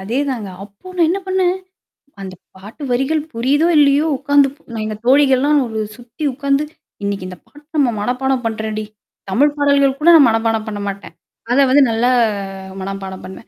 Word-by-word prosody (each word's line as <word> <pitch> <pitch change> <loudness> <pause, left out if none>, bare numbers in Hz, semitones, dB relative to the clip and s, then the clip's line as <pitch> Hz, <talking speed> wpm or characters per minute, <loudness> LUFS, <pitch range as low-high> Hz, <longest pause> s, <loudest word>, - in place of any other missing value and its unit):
அதேதாங்க. 240 +1 -2 0.2
அப்போ 200 - -19
நான் 335 -2 +3
என்ன 390 +2 -1
பண்ணேன்? 375 -1 +1 0.7
அந்த 190 -1 -7 0.2
பாட்டு 205 +10 -11
வரிகள் 270 +5 +1
புரியுதோ, 275 +8 +1
இல்லயோ 290 +1 +4
உக்காந்து 285 0 +3 0.4
எங்க 215 0 -4
தோழிகள்லாம் 280 +2 +4
ஒரு 220 -1 -4 0.2
சுத்தி 245 +5 -10
உக்காந்து 280 +1 0 0.4
இன்னைக்கு 200 -2 -3
இந்த 180 -1 -9
பாட்டு 295 0 -19
நம்ம 275 -4 +3
மனப்பாடம் 255 +3 -1
பண்றோம்டி. 215 -1 -3 0.4
தமிழ் 285 +9 +2
பாடல்கள் 280 -1 +2
கூட 330 +3 +4
நான் 285 -6 +7
மனப்பாடம் 225 0 0
பண்ண 210 -1 -5
மாட்டேன். 200 0 -7 0.4
அத 255 - +3
வந்து 280 +2 +5
நல்லா 230 +3 +1 0.7
மனப்பாடம் 195 -1 -6
பண்ணுவேன். 190 +4 -11
255 Hz, 150 wpm, -18 LUFS, 215-285 Hz, 0.7 s, நான்